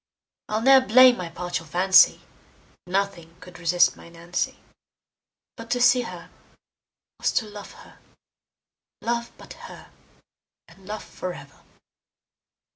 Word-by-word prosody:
I'll 215 +1 -1
ne'er 265 +1 +7
blame 255 +1 +6
my 180 -2 -6
partial 170 -1 -5
fancy, 190 +4 +4 0.7
Nothing 185 -3 -3
could 180 -1 -14
resist 175 +1 +2
my - - -15
Nancy; 170 +1 -4 1.0
But 230 -1 -11
to 245 - 0
see 245 +1 +4
her 235 - -10 0.9
was - - 0
to 225 - 0
love 205 -1 -11
her; - - -17 1.0
Love 235 0 -2
but - - -12 0.2
her, - - -14 0.8
and 185 +3 -19
love 215 +1 -6
forever. 145 -6 -9
190 Hz, 120 wpm, -24 LUFS, 175-230 Hz, 1.0 s, ne'er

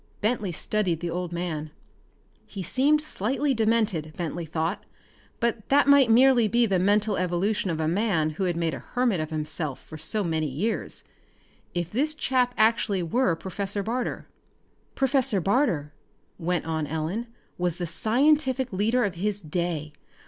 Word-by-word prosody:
Bentley 210 -3 0
studied 180 -1 -1
the 175 -1 -3
old 175 0 -3
man. 170 -3 -3 0.8
He 195 -3 -6
seemed 285 - +2
slightly 275 +1 0
demented, 220 -9 +1
Bentley 170 -1 -4
thought, 160 +1 -2 0.6
but 235 -2 -1
that 285 +1 +4
might 280 -2 +7
be 225 - +4
merely 250 -2 +5 0.2
the 195 -4 +1
mental 205 +2 +2
evolution 185 +3 0
of 160 -2 -2
a 155 - 0
man 170 -4 +1
who 175 +5 -2
had 175 -2 -1
made 165 -2 0
a - - -5
hermit 245 -7 0
of 155 0 -3
himself 155 -2 -3
for 155 - -11
so 200 +7 -1
many 160 -3 0
years 165 - -3 0.7
if 175 -1 -2
this 300 +7 0
chap 255 -4 +1
actually 215 -4 +2
were 185 +1 +1
Professor 200 +3 -4
Barter. 240 +4 -3 0.7
"Professor 265 -6 +2
Barter," 185 - +1 0.5
went 175 -1 -1
on 160 -2 -2
Ellen, 160 +10 -3 0.3
"was 175 -2 -1
the 175 - -2
scientific 260 - +2
leader 225 +6 +2
of 200 -4 0
his 200 +3 -2
day. 160 -3 -3
195 Hz, 155 wpm, -26 LUFS, 165-235 Hz, 0.8 s, might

